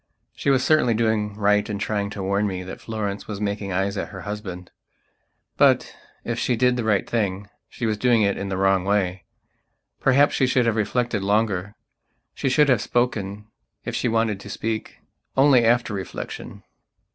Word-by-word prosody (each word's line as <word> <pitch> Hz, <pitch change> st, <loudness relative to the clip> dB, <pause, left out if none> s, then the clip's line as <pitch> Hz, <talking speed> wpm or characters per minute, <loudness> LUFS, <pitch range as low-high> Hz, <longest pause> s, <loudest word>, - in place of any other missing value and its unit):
She -, -, -1 dB
was 130 Hz, -2 st, +3 dB
certainly 140 Hz, -7 st, +3 dB
doing 110 Hz, -2 st, 0 dB
right 105 Hz, 0 st, +2 dB
in 105 Hz, -, -2 dB
trying 100 Hz, 0 st, -2 dB
to 100 Hz, -1 st, -6 dB
warn 100 Hz, +2 st, +1 dB
me 90 Hz, -2 st, -4 dB
that 95 Hz, -, -9 dB
Florence 105 Hz, -3 st, -4 dB
was 105 Hz, -2 st, -5 dB
making 100 Hz, -1 st, -3 dB
eyes 95 Hz, +2 st, -1 dB
at -, -, -2 dB
her 95 Hz, -2 st, -9 dB
husband. 95 Hz, -3 st, -6 dB, 0.9 s
But, -, -, +3 dB, 0.3 s
if 115 Hz, 0 st, -3 dB
she 125 Hz, -, +1 dB
did 125 Hz, +1 st, +3 dB
the 120 Hz, -, -2 dB
right 105 Hz, -3 st, +1 dB
thing, 100 Hz, -3 st, -2 dB, 0.2 s
she 115 Hz, -, -5 dB
was 110 Hz, -2 st, -1 dB
doing 120 Hz, -2 st, +3 dB
it 100 Hz, -1 st, +2 dB
in 100 Hz, -, -4 dB
the 95 Hz, -, -2 dB
wrong 95 Hz, -1 st, +2 dB
way. 95 Hz, -2 st, 0 dB, 0.7 s
Perhaps 140 Hz, +2 st, +4 dB
she 130 Hz, -, +2 dB
should 125 Hz, -1 st, +2 dB
have 115 Hz, -2 st, +1 dB
reflected 110 Hz, +1 st, 0 dB
longer; 100 Hz, -1 st, 0 dB, 0.6 s
she 135 Hz, -, -1 dB
should 150 Hz, +3 st, +4 dB
have 125 Hz, -6 st, +3 dB
spoken, 105 Hz, -4 st, -1 dB, 0.4 s
if -, -, -3 dB
she -, -, 0 dB
wanted 115 Hz, -3 st, +1 dB
to 100 Hz, -, -10 dB
speak, 110 Hz, +2 st, -4 dB, 0.4 s
only 135 Hz, -3 st, +6 dB
after 115 Hz, -1 st, +2 dB
reflection. 95 Hz, -1 st, -7 dB
105 Hz, 180 wpm, -23 LUFS, 100-115 Hz, 0.9 s, only